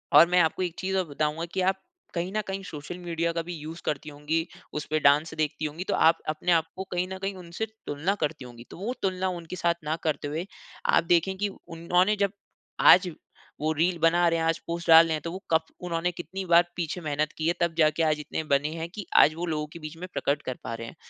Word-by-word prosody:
और 155 +3 +9
मैं 180 0 +4
आपको 165 +3 +1
एक 175 -2 -3
चीज़ 190 0 -1
और 185 - +1
बताऊँगा 150 +3 -1
कि 190 - 0
आप 190 +1 +1 0.3
कहीं 175 +2 -2
न 215 - +2
कहीं 195 0 -3
सोशल 165 0 -7
मीडिया 170 -1 -1
का 165 - -1
भी 175 - -6
यूज़ 160 +2 -8
करती 150 0 -2
होंगी, 150 +3 -2 0.3
उस 150 - -3
पे 155 - +2
डांस 150 +3 +4
देखती 155 0 -1
होंगी, 155 +4 -4
तो - - -2
आप 165 +1 +5
अपने 155 +3 0
आप 165 -2 +4
को 190 - -4
कहीं 180 +1 0
न 190 - -5
कहीं 195 0 -1
उनसे 175 +4 -4 0.2
तुलना 150 +7 0
करती 150 -3 -2
होंगी, 120 -1 -11
तो - - -11
वो 215 +8 -3
तुलना 190 -1 0
उनके 175 0 -6
साथ 170 -1 +2
ना 155 +2 -1
करते 155 -2 -1
हुए, 160 +5 -3 0.4
आप - - +5
देखें 175 +3 +2
कि 205 +1 0
उन्होंने 180 +3 0
जब 200 -1 +2 0.5
आज 180 0 +7 0.5
वो 155 +1 +1
रील 170 +3 +1
बना 170 +1 +4
रहे 165 0 +1
हैं, 165 - 0
आज 165 0 +1
पोस्ट 170 0 -4
डाल 165 0 +10
रहे 160 - -1
हैं, 155 - -2
तो 165 - -5
वो 190 +2 -7
कब 160 0 +5 0.2
उन्होंने 175 0 -1
कितनी 185 +2 -6
बार 175 0 +6
पीछे 175 0 -3
मेहनत 150 -1 -1
की 160 +1 -1
है, 170 - +3
तब 170 -1 +1
जाके 155 +1 +4
आज 155 -1 +2
इतने 155 +1 -4
बने 145 0 +1
हैं 165 0 -4
कि 205 - -5
आज 155 - +7
वो 175 +1 -3
लोगों 150 -2 -2
के 170 - -9
बीच 155 +1 -8
में 180 +2 -6
प्रकट 145 +1 0
कर 130 - -4
पा 115 - -4
रहे 115 0 -7
हैं। - - -10
165 Hz, 250 wpm, -27 LUFS, 155-180 Hz, 0.5 s, डाल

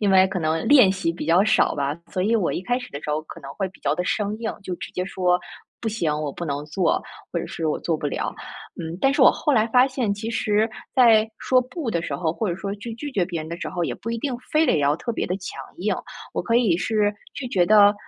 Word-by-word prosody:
因 205 -2 +2
为 190 0 +6
可 185 - -2
能 160 -1 0
练 255 -10 +7
习 185 -3 -1
比 165 - -6
较 175 +4 +5
少 220 +3 +3
吧， 140 0 -1 0.2
所 185 - -1
以 225 +4 +2
我 205 -6 +2
一 180 - -3
开 245 +6 0
始 245 - -9
的 140 - -6
时 150 - -3
候 150 +1 0
可 160 - -11
能 135 - -9
会 195 -2 -1
比 185 - -20
较 - - +1
地 180 - -1
生 210 +2 -1
硬， 225 -1 -2
就 185 -2 -4
直 - - -7
接 180 - -2
说： 180 -2 +1 0.4
“不 225 - 0
行， 210 -8 -1
我 145 -2 -3
不 170 - -5
能 145 0 -3
做， 175 +4 0 0.3
“或 170 - -1
者 - - -4
是” 160 - -4
我 - - 0
做 170 - -1
不 150 -1 -2
了。” - - -3 0.5
嗯， 165 +1 -5
但 270 0 +4
是 - - 0
我 - - +9
后 295 - 0
来 220 -2 +4
发 250 +3 +5
现， 250 -6 -1
其 220 +3 -5
实 220 0 +1 0.2
在 225 -4 +6
说 255 -1 +3
不 255 0 -4
的 170 - 0
时 170 - -3
候， 165 -3 0
或 215 +2 -2
者 175 - -2
说 200 +1 -4
去 225 +3 -7
拒 285 +4 -6
绝 195 - +1
别 175 -3 -4
人 155 +1 -6
的 170 - -3
时 - - -3
候， 175 -1 -2
也 - - -2
不 230 - -6
一 230 - -1
定 260 +2 -2 0.2
非 310 +1 +4
得 245 - +3
要 145 +1 +2
特 235 +7 -4
别 - - -2
地 180 - -1
强 190 - -7 0.2
硬， 195 +2 0 0.4
我 - - -2
可 230 +6 +2
以 220 -9 +3
是 210 +3 +1 0.2
拒 265 - -5
绝 180 -6 +2
得， 205 -1 +7
195 Hz, 300 characters per minute, -23 LUFS, 170-230 Hz, 0.5 s, 我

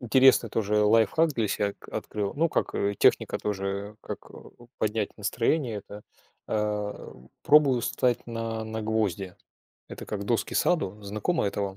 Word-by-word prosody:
Интересный 130 -1 +5
тоже 105 -1 -1
лайфхак 115 +9 +4
для 115 -5 0
себя 100 0 0
к - - -16
открыл. 105 -2 -4
Ну, 165 +3 +2
как, - - -1
э, 100 0 0
техника - - +3
тоже, 100 +1 -3
как, - - -5
э, - - -15
у 120 - -15
поднять 105 -1 -1
настроение. 110 +2 0
Да. 105 0 -9 0.4
А, 105 -1 -2
у, 65 0 -18
пробую 145 -4 +5
встать 125 +1 0
на 115 -1 -4
на 110 0 -4
гвозди. 100 -4 -1 0.5
Это - - -8
как 100 -1 -4
доски 115 +2 0
саду. 105 - +1
Знакомо 105 - -1
это 100 0 -2
вам? 95 -1 -4
105 Hz, 165 wpm, -27 LUFS, 100-120 Hz, 0.5 s, Интересный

